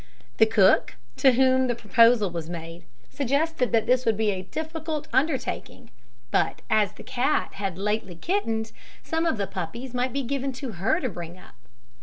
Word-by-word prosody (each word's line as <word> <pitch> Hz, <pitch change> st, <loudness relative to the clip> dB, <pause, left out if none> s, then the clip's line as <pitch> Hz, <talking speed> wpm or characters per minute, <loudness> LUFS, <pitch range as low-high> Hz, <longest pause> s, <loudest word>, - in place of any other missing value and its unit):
The 220 Hz, -, +6 dB
cook, 200 Hz, -4 st, +4 dB, 0.2 s
to 265 Hz, -2 st, +5 dB
whom 260 Hz, +1 st, +4 dB
the 240 Hz, -, 0 dB
proposal 230 Hz, -2 st, +4 dB
was 165 Hz, -1 st, -5 dB
made, 165 Hz, 0 st, -8 dB, 0.3 s
suggested 280 Hz, 0 st, 0 dB
that 225 Hz, -2 st, +2 dB
this 255 Hz, 0 st, +3 dB
would 225 Hz, -4 st, +1 dB
be 215 Hz, -1 st, +2 dB
a 190 Hz, -2 st, -3 dB
difficult 315 Hz, -, -5 dB
undertaking; 265 Hz, -4 st, -1 dB, 0.4 s
but -, -, 0 dB
as 210 Hz, -3 st, +3 dB
the -, -, -12 dB
cat 255 Hz, +3 st, 0 dB
had 195 Hz, -3 st, -4 dB
lately 210 Hz, -2 st, -2 dB
kittened, 225 Hz, -, -1 dB, 0.3 s
some 325 Hz, +1 st, -1 dB
of 315 Hz, -, 0 dB
the 200 Hz, -, -1 dB
puppies 195 Hz, +7 st, -6 dB
might 250 Hz, +1 st, 0 dB
be 275 Hz, +2 st, -2 dB
given 270 Hz, +1 st, -2 dB
to 260 Hz, -1 st, -6 dB
her 225 Hz, -, +2 dB
to 265 Hz, -, -2 dB
bring 175 Hz, -2 st, -8 dB
up. -, -, -16 dB
235 Hz, 175 wpm, -25 LUFS, 200-270 Hz, 0.4 s, The